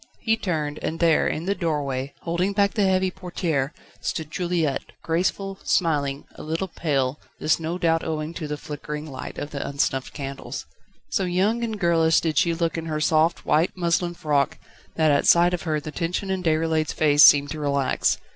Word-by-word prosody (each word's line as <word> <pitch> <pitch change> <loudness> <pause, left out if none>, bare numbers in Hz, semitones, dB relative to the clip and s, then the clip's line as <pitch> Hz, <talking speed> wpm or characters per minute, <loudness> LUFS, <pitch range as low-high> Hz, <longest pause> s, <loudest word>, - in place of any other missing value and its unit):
He 225 -1 +2
turned, 155 -8 -2
and 165 - -3
there 165 -2 +4
in 160 - -2
the 200 - +1
doorway, 140 -6 -2
holding 175 +4 -1
back 200 0 +2
the 205 -3 +2
heavy 185 0 +2
portière, 175 -7 -2 0.3
stood 155 -1 -4
Juliette, 170 -6 -1
graceful, 190 +4 -1
smiling, 145 -5 0
a - - -11
little 165 +5 -2
pale, 140 -5 -1 0.2
this 155 - +2
no 165 +2 -3
doubt 165 -2 +1
owing 155 0 -3
to 165 -3 -5
the 150 0 -3
flickering 150 +1 -6
light 135 -4 -7
of 145 - -5
the 140 - -4
unsnuffed 135 -1 -1
candles. 135 -3 -6 0.5
So 195 - +1
young 195 +7 +1
and 220 -2 -3
girlish 165 -3 +4
did 155 -4 +1
she 170 - +2
look 165 0 -1
in 165 - -6
her 155 -1 -2
soft, 160 +2 +2
white 160 +5 +2
muslin 175 0 0
frock 145 -4 0 0.4
that 155 -2 +3
at 140 - +2
sight 175 +1 +6
of 175 - -1
her 155 -1 +1
the 155 +1 -7
tension 180 +4 -2
in 190 -1 -1
Déroulède's 160 -2 +1
face 150 -2 +4
seemed 145 -1 +7
to 155 - -5
relax. 140 -2 +1
160 Hz, 185 wpm, -24 LUFS, 150-175 Hz, 0.5 s, seemed